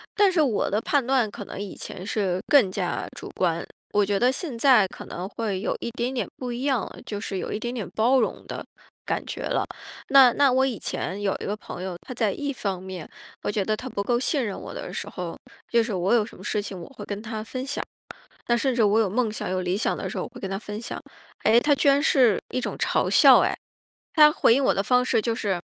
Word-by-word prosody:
但 405 -2 +5
是 345 - +3
我 255 -8 +1
的 210 +3 0
判 280 -1 +1
断 255 -4 +2
可 205 -1 -8
能 - - -8
以 200 -2 -6
前 180 - -8
是 195 -4 0
更 240 -10 +5
加 185 -2 -2
主 - - -8
观， 170 -2 0 0.3
我 205 0 +4
觉 200 0 0
得 250 +3 +4
现 265 -4 -5
在 235 -6 +5
可 - - -10
能 180 +3 -6
会 210 -5 -3
有 - - -1
一 235 - -4
点 240 +1 -2
点 260 - -2
不 250 -2 -4
一 245 +2 -4
样 265 -6 +2
了， - - -8
就 205 -1 -5
是 195 -4 -4
有 - - -4
一 210 - -2
点 240 +1 -3
点 235 -5 -4
包 245 +5 +4
容 - - -1
的 - - -6 0.4
感 - - -1
觉 - - -5
了。 - - 0 0.5
那 265 -3 +8
那 280 -2 +4
我 265 +1 +3
以 245 -6 -2
前 200 +2 -4
有 195 -1 +1
一 - - -4
个 205 - -1
朋 185 -3 -8
友， 185 -2 -4
他 - - -11
在 225 -4 0
一 285 +4 -3
方 195 -7 -3
面， 185 -4 -7 0.4
我 - - 0
觉 205 -2 0
得 215 +2 -1
他 255 - -7
不 200 - -3
够 240 +3 +1
信 270 +1 +1
任 205 -3 -4
我 - - -8
的 - - -6
时 200 - -5
候 180 -5 -6 0.3
就 235 -1 +3
是 225 -2 -4
我 185 +1 0
有 220 - +3
什 - - -13
么 - - -13
事 210 - -1
情 200 -3 -5
我 - - -9
会 - - -7
跟 205 0 -5
他 220 -1 -5
分 255 +3 -5
享， 285 - -3 0.7
那 240 - +4
甚 260 +1 +1
至 235 - +2
我 210 +1 +4
有 215 - +2
梦 225 +1 +1
想、 215 - -4
有 185 0 0
理 180 +1 0
想 210 - 0
的 - - -4
时 - - -6
候， - - -2
我 - - -7
会 - - -12
跟 195 - -4
他 195 - -2
分 210 0 -6
享。 235 - -5 0.5
哎， 225 +2 +6
他 295 - +2
居 280 - 0
然 280 +1 +5
是 255 -8 +4
一 255 - -1
种 - - -4
嘲 - - +1
笑 - - +8
哎， - - +1 0.6
他 300 -2 +8
回 230 - +4
应 275 +1 +2
我 - - +4
的 195 - 0
方 250 +3 +3
式 235 -3 +2
就 230 +1 -1
是 200 -6 -1
225 Hz, 285 characters per minute, -25 LUFS, 200-255 Hz, 0.7 s, 那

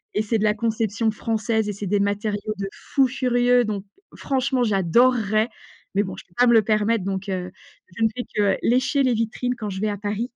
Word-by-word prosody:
et 210 - +2
c'est 225 +1 0
de - - -1
la 210 - +3
conception 220 0 0
française 220 0 -1
et 205 - -2
c'est 200 0 -6
des 205 +2 +1
matériaux 205 +1 -1
de 195 - -2
fou 270 -2 +1
furieux. 245 -1 +2
Donc 205 -2 -3 0.3
franchement, 265 -1 0
j'adorerais! 215 +2 +2 0.5
Mais 205 - +3
bon, 190 - -6
je - - -10
peux 175 - -28
pas 245 - +5
me 235 - +5
le 225 - +7
permettre 215 0 +1
donc, 195 0 -3
heu, 180 -1 -3 0.5
je 230 - -5
ne - - +6
fais 245 - -3
que 205 -2 +2
lécher 260 +3 +2
les 255 - +2
vitrines 230 +2 -1
quand 215 -3 -5
je 190 0 -5
vais 215 - +1
à 205 - -3
Paris. 210 +4 -3
215 Hz, 220 wpm, -23 LUFS, 205-245 Hz, 0.5 s, le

